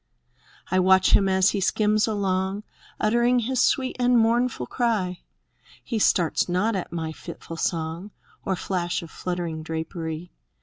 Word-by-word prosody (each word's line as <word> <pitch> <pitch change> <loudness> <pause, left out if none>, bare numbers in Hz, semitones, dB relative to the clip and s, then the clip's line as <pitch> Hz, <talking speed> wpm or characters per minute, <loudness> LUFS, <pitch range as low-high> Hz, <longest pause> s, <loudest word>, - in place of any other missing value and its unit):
I 185 - +3
watch 185 0 +5
him 195 -1 +3
as 190 +1 +3
he 200 - -2
skims 210 +2 +2
along. 195 -1 -1 0.4
Uttering 235 +3 +3
his 245 +1 0
sweet 260 -1 +1
and 245 0 +4
mournful 230 - +2
cry; 200 - -1 0.6
He 230 - -2
starts 175 -4 +2
not 205 +5 +1
at 185 - -4
my 165 -2 -3
fitful 165 0 -9
song. 165 +4 -2 0.3
Or 190 - -1
flash 175 -2 -2
of 165 - -11
fluttering 175 -3 -4
drapery. 160 +1 -5
190 Hz, 140 wpm, -25 LUFS, 170-220 Hz, 0.6 s, watch